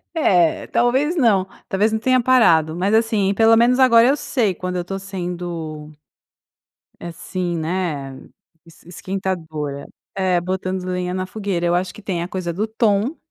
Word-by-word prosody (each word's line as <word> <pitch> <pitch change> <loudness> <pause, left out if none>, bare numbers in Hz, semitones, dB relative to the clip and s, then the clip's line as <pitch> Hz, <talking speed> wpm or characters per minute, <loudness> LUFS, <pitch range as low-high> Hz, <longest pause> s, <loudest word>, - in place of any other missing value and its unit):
É, 180 - +2
talvez 260 +7 +1
não, 215 - +2 0.2
talvez 205 +3 +1
não 220 - -1
tenha 255 +3 +2
parado, 170 -11 +4
mas 190 +4 0
assim, 220 -3 +2
pelo 225 +2 +5
menos 240 +2 +4
agora 235 -2 +6
eu 280 +3 +2
sei 225 -9 0
quando 180 +1 -5
eu - - -1
estou 195 +2 -5
sendo 175 -5 -6 1.1
assim, 175 +1 -4
né, 160 -5 -3 0.5
es 165 - -19
esquentadora. 165 -6 -5 0.3
É, 185 -2 +1
botando 185 +1 -3
lenha 180 0 -3
na 185 0 -3
fogueira, 195 -3 -3
eu 170 - +2
acho 180 +1 -2
que - - -13
tem 180 -4 -3
a - - -5
coisa 185 -2 -4
do 195 +6 -2
tom 220 +4 0
185 Hz, 160 wpm, -20 LUFS, 175-220 Hz, 1.1 s, agora